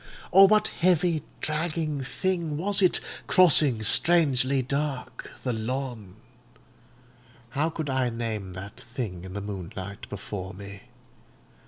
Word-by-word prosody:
or 195 +1 +8
what 215 +1 +3
heavy, 175 -2 +1 0.2
dragging 155 -2 -2
thing 165 +3 -2
was 200 +5 0
it, 185 - +4 0.3
crossing, 150 -10 +5
strangely 140 -1 +4
dark, 130 -2 -4
the 125 - -1
lawn. 115 -4 -4 1.4
How 155 +4 0
could 160 -2 -5
I 130 -2 0
name 110 -5 -4
that 95 +3 -9
thing 115 -8 -6
in 95 0 -9
the 100 - -4
moonlight 100 0 -7
before 95 -2 -6
me? 100 +2 -10
130 Hz, 120 wpm, -26 LUFS, 105-160 Hz, 1.4 s, or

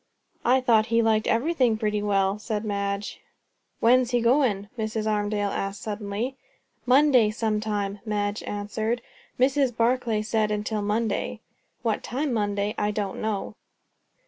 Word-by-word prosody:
"I 260 +2 +4
thought 225 -3 +3
he 230 0 +3
liked 220 -1 +2
everything 250 -2 +2
pretty 210 -1 -1
well," 200 -1 +1
said 215 -1 -3
Madge. 200 0 -3 0.6
"When's 245 +1 +4
he 245 -1 +2
goin'?" 235 -5 +2
Mrs. 220 -1 -2
Armadale 205 -1 0
asked 195 +1 -4
suddenly. 215 +4 -3 0.5
"Monday, 255 -4 +5
some 215 -1 -1
time," 205 -2 -2
Madge 205 -2 -2
answered. 220 +3 -3 0.4
"Mrs. 260 -2 +2
Barclay 230 -2 +1
said 215 -1 +1
'until 210 0 -2
Monday.' 215 +2 -1 0.4
What 225 -3 0
time 270 +2 -2
Monday 205 -1 0
I 210 - +1
don't 205 -2 -3
know." 215 -1 -2
215 Hz, 135 wpm, -25 LUFS, 205-235 Hz, 0.6 s, Monday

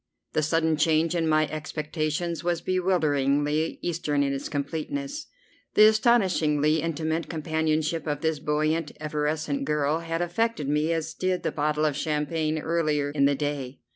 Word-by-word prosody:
The 155 - +2
sudden 160 +1 +1
change 160 +2 +2
in 165 -2 0
my 155 0 +3
expectations 155 +2 -3
was 175 -1 0
bewilderingly 155 -4 +1
Eastern 150 -4 0
in 140 0 0
its 135 - -4
completeness. 275 - -4 0.5
The 215 - +8
astonishingly 180 - +3
intimate 160 0 -2
companionship 160 0 -1
of 145 -1 -2
this 160 -2 0
buoyant, 155 +1 0
effervescent 150 -1 -2
girl 150 +1 +1
had 165 +1 -2
affected 175 -3 -1
me 150 +3 +1
as 165 -1 -2
did 185 -1 -1
the - - 0
bottle 150 +1 0
of 150 -2 +1
champagne 155 +1 -1
earlier 155 -3 0
in 140 -1 +2
the 140 0 +3
day. 140 -2 -3
155 Hz, 145 wpm, -26 LUFS, 150-165 Hz, 0.5 s, The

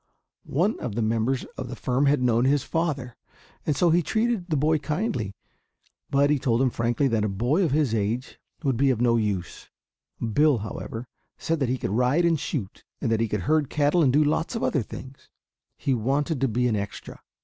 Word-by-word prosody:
One 180 - +1
of 115 -5 -4
the 115 - 0
members 115 +4 0
of 125 - -5
the 125 - -5
firm 130 +4 +1
had 140 -2 +3
known 120 0 +3
his 140 0 +2
father, 145 -7 -2 0.5
and 150 - +2
so 175 +1 +4
he 175 +2 +4
treated 220 +1 0
the 155 - +1
boy 155 +2 +2
kindly. 150 - -2 0.7
But 140 +1 +3
he 150 - +2
told 120 -3 +1
him 130 -1 +2
frankly 120 +5 +1
that 110 -3 +1
a 105 - 0
boy 120 - +1
of 165 - +2
his 140 -4 +1
age 115 +4 -2 0.2
would 135 -5 +1
be 135 +2 +3
of 125 -4 +1
no 120 -1 +3
use. 105 -6 -2 0.5
Bill, 140 +5 +3
however, 115 +2 -6 0.3
said 165 -1 -1
that 135 -4 0
he 130 - 0
could 95 - -3
ride 125 +10 +2
and 165 -3 +2
shoot, 110 - -4 0.2
that 115 -3 0
he 115 - +1
could 105 -2 -2
herd 150 - +1
cattle 150 +4 +2
and 135 -5 +4
do 150 +3 +4
a - - 0
lot 160 +8 0
of 230 - -2
other 140 - +1
things. 130 +4 -10 0.5
He 135 - 0
wanted 135 +5 0
to 135 - +3
be 125 +2 +1
an 115 - +1
"extra." 100 -1 -6
130 Hz, 210 wpm, -25 LUFS, 115-150 Hz, 0.7 s, so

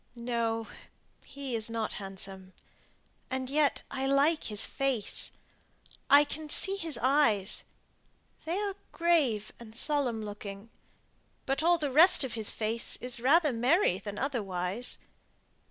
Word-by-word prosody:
"No; 235 -1 -2 0.6
he 275 -3 -5
is 220 0 -1
not 225 -1 -3
handsome. 190 -1 -8 0.8
And 260 0 -3
yet 295 0 +2
I 265 0 -2
like 285 +4 +2
his 210 -1 0
face. 270 -7 -2 0.8
I 285 +1 +8
can 305 +1 -5
see 390 +6 +3
his 330 -6 -3
eyes. 240 -8 +2 0.8
They 335 +3 -1
are 405 -1 -2 0.2
grave 295 - +1
and 225 -2 -12
solemn 250 -5 0
looking; 205 +1 -8 0.7
but 270 +2 0
all 345 +2 +4
the 295 -4 -2
rest 320 +4 +7
of 260 -3 -4
his 220 -2 +1
face 225 +1 -1
is 250 0 -1
rather 295 +3 +4
merry 245 - +2
than 205 -1 -7
otherwise. 205 -4 -2
250 Hz, 130 wpm, -30 LUFS, 220-295 Hz, 0.8 s, I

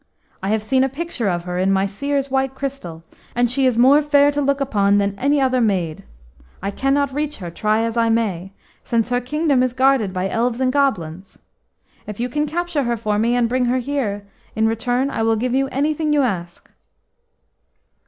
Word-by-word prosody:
I 190 - -2
have 215 0 0
seen 260 +4 +2
a 270 - +1
picture 275 -6 -3
of 175 -1 -2
her 180 0 -4
in 190 +1 +2
my 195 0 +2
Seer's 275 +7 -2
white 265 0 0
crystal, 265 -13 -6 0.3
and 245 0 +3
she 265 +1 +2
is 245 -3 +1
more 270 +5 +6
fair 290 -1 +4
to 290 0 -1
look 280 0 +1
upon 205 -7 +2
than 200 -1 +1
any 285 +2 +2
other 255 -2 +2
maid. 180 -8 -1 0.6
I 200 +1 -3
cannot 275 +4 0
reach 295 +1 -2
her, 175 -4 -7
try 215 +5 0
as 230 0 -2
I 230 -1 +3
may, 195 -5 -1 0.3
since 230 -1 0
her 245 0 0
kingdom 290 +1 +1
is 255 -1 0
guarded 260 -5 +2
by 185 0 -2
elves 235 +4 -1
and 255 -1 +1
goblins. 190 - -1 0.7
If 210 0 -7
you 245 +1 -1
can 295 +4 -1
capture 345 0 -2
her 235 0 0
for 210 -1 -1
me 235 +2 +2
and 245 -1 +2
bring 250 +1 0
her 245 +1 +1
here, 240 -6 -2 0.3
in 220 0 +2
return 245 +4 0
I 225 - -2
will 225 0 +2
give 245 +3 -1
you 270 +1 +1
anything 300 +3 0
you 290 -2 +3
ask." 175 -7 -4
245 Hz, 200 wpm, -20 LUFS, 205-275 Hz, 0.7 s, more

